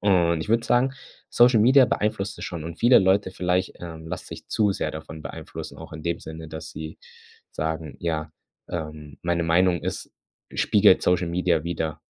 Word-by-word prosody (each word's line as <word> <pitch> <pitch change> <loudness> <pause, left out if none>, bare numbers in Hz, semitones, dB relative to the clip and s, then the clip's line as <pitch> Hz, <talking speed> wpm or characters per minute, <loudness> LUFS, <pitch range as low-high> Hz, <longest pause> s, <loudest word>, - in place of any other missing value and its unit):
und 85 -5 +3
ich - - -9
würde 115 0 +3
sagen, 125 +2 +2 0.4
Social 120 -1 +5
Media 130 +3 +6
beeinflusst 105 -2 -1
es - - -5
schon 85 -3 -5
und 85 +1 -7
viele 120 +2 +7
Leute 95 0 +3
vielleicht, 90 0 0
ähm, 80 -2 -8
lassen 85 +2 -6
sich - - -10
zu 105 -2 +2
sehr - - -2
davon 80 0 -8
beeinflussen, - - -8
auch - - -10
in 80 - -8
dem 85 +1 -2
Sinne, 80 0 -8
dass 80 0 -7
sie 80 +1 -8 0.5
sagen: 80 -1 -4
„Ja, 80 -2 -2 0.4
ähm, 75 -3 -6
meine 85 0 0
Meinung 85 +2 +3
ist - - -4 0.4
spiegelt 100 -2 +5
Social 90 -1 +2
Media 85 -2 +1
wider." 80 -2 -3
85 Hz, 180 wpm, -25 LUFS, 80-95 Hz, 0.5 s, viele